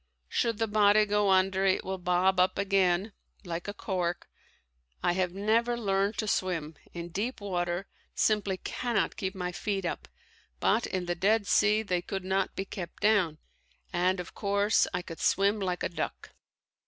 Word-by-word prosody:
Should 230 -2 0
the 225 - +1
body 210 0 +5
go 205 -1 +2
under 190 0 +3
it 190 -1 +2
will 190 0 -3
bob 180 +1 +2
up 185 0 +3
again 195 0 +2 0.3
like 170 +1 -4
a 205 - -3
cork. 180 -4 -2 0.8
I - - +3
have 180 0 0
never 225 +5 +1
learned 200 -1 0
to 215 - -1
swim; 165 -6 -1 0.2
in 170 0 -6
deep 210 +9 -3
water 175 -2 -2 0.3
simply 205 -3 +1
cannot 240 +4 -1
keep 190 -1 -3
my 180 -1 -3
feet 195 +1 -2
up, - - -4 0.5
but 235 - +2
in 185 -1 -2
the 175 - 0
Dead 205 +4 +2
Sea 210 +3 +3
they 180 -4 -1
could 195 +1 -5
not 190 0 0
be 195 - -3
kept 180 -3 -7
down, 200 -7 +3 0.6
and 180 +2 +2
of 180 - -7
course 200 +1 +2
I 180 -1 -2
could 165 -2 -9
swim 200 +2 +2
like 180 -3 -2
a - - 0
duck. 170 - -5
190 Hz, 170 wpm, -29 LUFS, 180-205 Hz, 0.8 s, body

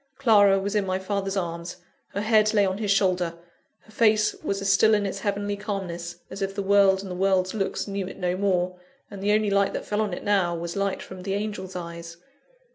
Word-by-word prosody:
Clara 205 -7 +5
was 200 +1 -2
in 210 -1 +2
my 185 -1 -1
father's 195 0 -2
arms, 170 -1 -4 0.4
her 200 - 0
head 215 0 +3
lay 205 -1 +5
on 190 +1 -2
his 210 -2 -2
shoulder, 185 -4 +2 0.5
her 220 - -20
face 215 -1 +3
was 195 - -1
as 195 0 +1
still 215 +3 +5
in 205 -1 0
its 195 0 -3
heavenly 205 0 -2
calmness 175 -4 -5
as 195 - -7
if 195 0 -2
the 200 - -2
world 195 -1 +4
and 190 - -7
the - - -3
world's 185 0 +1
looks 205 -1 -2
knew 195 -2 -3
it - - -9
no 180 -1 -1
more, 185 -2 0 0.3
and 200 -2 -8
the 205 +1 +1
only 210 -1 +2
light 200 0 +2
that - - -4
fell 210 +1 -1
on 210 -2 -1
it 175 - -5
now, 190 -4 +2
was 170 0 -5
light 200 -1 -1
from 190 -1 -10
the 195 +1 -2
angel's 205 -3 -4
eyes. 170 -1 -7
195 Hz, 225 wpm, -25 LUFS, 185-205 Hz, 0.5 s, Clara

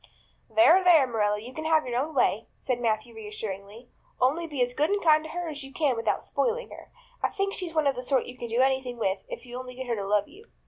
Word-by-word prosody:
"There, 350 +3 +6
there, 335 -6 +7
Marilla, 210 -4 0
you 240 +4 -10
can 315 +3 -6
have 315 -1 +3
your 245 -1 -1
own 305 +2 -5
way," 225 -4 +2
said 245 -2 -2
Matthew 225 0 -1
reassuringly. 210 +1 -7 0.3
"Only 300 +7 +2
be 285 -5 0
as 245 0 -2
good 295 +4 +1
and 410 0 +1
kind 310 -2 +5
to 315 - -8
her 350 +1 -4
as 290 -3 -5
you 270 - -10
can 285 -3 +1
without 230 0 -1
spoiling - - -1
her. - - -12 0.3
I - - -36
kind - - -1
of - - -21
think 395 0 0
she's 345 -3 -4
one 310 -1 +2
of 280 - +3
the 250 - -5
sort 260 +1 +1
you 250 - -9
can 240 - -6
do 235 +2 +1
anything 260 -2 +1
with 195 -3 0
if - - -7
you 245 0 -7
only 250 -1 -8
get 260 +1 -6
her 240 -2 -1
to 200 -2 -4
love 205 0 +2
you." 425 +4 -16
255 Hz, 270 wpm, -27 LUFS, 230-315 Hz, 0.3 s, there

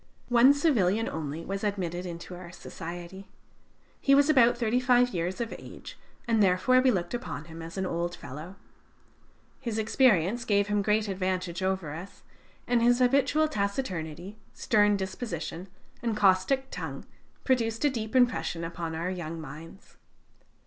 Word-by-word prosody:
One 245 +2 +7
civilian 225 - +2
only 160 +1 -5
was 195 +1 -4
admitted 185 -3 -2
into 170 +1 -8
our 175 -1 -10
society. 175 +3 -8 0.7
He 275 - +4
was 285 +2 +5
about 240 -4 +5
thirty 240 +1 +1
five 250 -1 +4
years 180 -2 -3
of 235 -1 -3
age, - - -11 0.3
and 225 -2 +3
therefore 200 +7 +4
we 260 - +4
looked 180 -5 -1
upon 240 - -5
him 165 0 -10
as 165 +3 -8
an 190 - -1
old 175 0 -2
fellow. 155 +7 -9 1.0
His 230 -3 -4
experience 220 -2 +3
gave 205 -3 +1
him 210 0 +2
great 210 +1 +1
advantage 185 -2 -2
over 185 -5 -1
us, 175 +5 -10 0.4
and 240 -1 +2
his 240 +1 +4
habitual 275 +5 +3
taciturnity, 200 - -3 0.2
stern 205 -2 +3
disposition, 185 -3 -5 0.3
and 230 -3 -1
caustic 205 +8 +2
tongue - - -6 0.4
produced 230 -1 +1
a - - +5
deep 220 -2 -5
impression 240 -9 +2
upon 165 -1 -4
our 170 +3 -2
young 165 -3 -5
minds. 160 +4 -11
195 Hz, 150 wpm, -28 LUFS, 175-240 Hz, 1.0 s, One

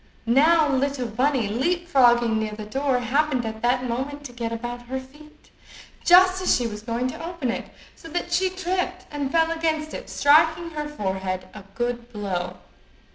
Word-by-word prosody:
Now 305 +7 +5
little 275 -2 0
bunny, 250 +1 +1
leap 340 - -1
frogging 240 -6 +4
near 215 -1 -3
the 210 0 -7
door, 270 +4 0
happened 265 +1 +1
that 240 +3 0
moment 275 +5 -4
to 275 - -8
get 235 -1 -4
about 240 +1 -5
her 265 +1 -3
feet, 295 +4 -17 0.5
just 370 +1 +6
as 370 - +3
she 245 - 0
was 210 -2 -5
going 235 +3 -2
to 255 - -7
open 335 -7 -3
it, - - -5 0.3
so - - -13
that 345 +1 -3
she 375 +2 +2
tripped 370 0 -3
and 285 -2 -3
fell 325 0 +3
against 315 -2 -1
it, - - -7
striking 320 +3 +4
her 300 -1 -4
forehead 190 -7 -3
a 210 - -9
good 240 0 -3
blow. 185 -4 -3
265 Hz, 175 wpm, -24 LUFS, 235-320 Hz, 0.5 s, just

